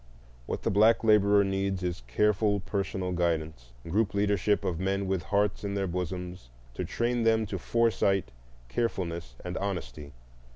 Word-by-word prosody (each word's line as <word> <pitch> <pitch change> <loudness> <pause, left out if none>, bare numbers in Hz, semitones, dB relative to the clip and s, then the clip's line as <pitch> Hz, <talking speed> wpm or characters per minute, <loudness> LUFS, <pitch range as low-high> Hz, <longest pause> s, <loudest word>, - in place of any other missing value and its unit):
What - - -4
the - - +1
black 110 +4 +4
laborer 105 -2 +5
needs 95 -1 -1
is 90 -7 -2
careful 105 - +2
personal 95 -2 -2
guidance, 80 -7 -1 0.2
group 100 +4 0
leadership 100 0 +1
of 85 -2 -1
men 95 +1 0
with 95 -2 -1
hearts 100 +6 0
in 100 0 -2
their 100 -1 0
bosoms, 90 -3 -5 0.2
to - - -3
train 120 +1 -1
them 110 -1 +3
to 95 -2 -4
foresight, 100 - +1 0.4
carefulness, 85 - -3
and 90 0 -4
honesty. 75 -8 -4
95 Hz, 150 wpm, -28 LUFS, 85-105 Hz, 0.4 s, laborer